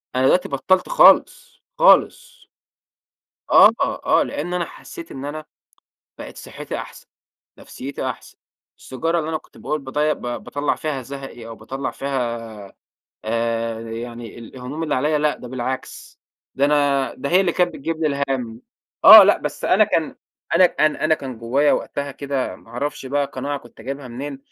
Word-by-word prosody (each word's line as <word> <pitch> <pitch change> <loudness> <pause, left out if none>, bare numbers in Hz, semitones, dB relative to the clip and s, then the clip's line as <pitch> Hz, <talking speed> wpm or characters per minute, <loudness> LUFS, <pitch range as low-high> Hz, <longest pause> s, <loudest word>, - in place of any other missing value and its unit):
أنا 130 +1 +2
دلوقتي 180 - +3
بطَّلت 140 +7 +1
خالص، - - +4 0.2
خالص. - - +3 1.1
آه، - - +8 0.3
آه، - - +4
لإن 175 - -5
أنا 175 -1 -1
حسّيت 340 -2 -11
إن 135 +1 -7
أنا 155 +1 -6 0.7
بقِت - - -10
صحّتي - - -8
أحسن، - - -10 0.5
نفْسيتي 135 0 -7
أحسن، 125 - -9 0.4
السيجارة 165 +6 -2
اللي 160 0 -4
أنا 160 - -1
كنت - - -21
باقول 150 - -3
بضي 150 +3 0
ب - - -14
باطلَّع 145 +4 -3
فيها 150 -4 -4
زهقي، 135 -3 -9
أو 115 - -8
باطلَّع 130 +5 -5
فيها 115 -6 -5 0.5
آآ، 115 0 -2
يعني 115 0 -8
الهموم 130 +6 -8
اللي 160 - -1
عليَّ، 150 +3 +1
لأ 150 0 +1
ده 125 - -10
بالعكس، 130 +1 -6 0.3
ده 140 - +1
أنا 145 -2 +1
ده 140 - -5
هي 180 +2 +4
اللي 175 -3 +1
كانت 180 -1 +1
بتجيب 165 +4 -4
لي 155 - +1
الهَم، 135 -5 -2 0.4
آه - - +12
لأ - - +4
بس - - -6
أنا - - +4
كان - - -1 0.4
أنا 185 +2 +6 0.2
أنا 155 - -2
أنا 155 - +4
كان 130 -6 -8
جوايا 135 +6 +2
وقتها 140 -1 -3
كده 140 -1 -3
ما - - -21
أعرفش 145 -2 -4
بقى 140 +1 0
قناعة 140 +1 -4
كنت 120 -3 -17
جايبها 135 +2 -6
منين، 135 +3 -7
140 Hz, 160 wpm, -21 LUFS, 120-150 Hz, 1.1 s, آه